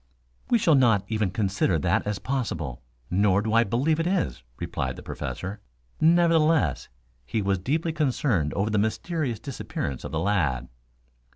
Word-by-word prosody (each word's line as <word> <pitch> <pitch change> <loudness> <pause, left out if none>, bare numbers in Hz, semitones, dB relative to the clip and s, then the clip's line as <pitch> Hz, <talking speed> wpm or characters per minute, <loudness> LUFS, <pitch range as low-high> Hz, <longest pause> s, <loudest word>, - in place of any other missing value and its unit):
"We 240 - +5
shall 175 -7 +3
not 115 -8 +4
even 110 -3 0
consider 95 -2 +1
that 80 - 0
as 105 -1 -1
possible, 85 - -3 0.3
nor 100 +1 +3
do 110 0 -1
I 115 0 +6
believe 135 +9 +1
it 165 - 0
is," 180 - -1 0.2
replied 65 -1 -3
the - - -10
Professor. 95 +3 -5 0.4
Nevertheless, 165 -1 +3 0.3
he 110 - -2
was 100 -2 0
deeply 155 - -1
concerned 130 - +1
over 105 +2 0
the 105 - +2
mysterious 120 - -1
disappearance 70 - -5
of - - -6
the 80 - -2
lad. 80 -9 0
110 Hz, 155 wpm, -26 LUFS, 95-155 Hz, 0.4 s, I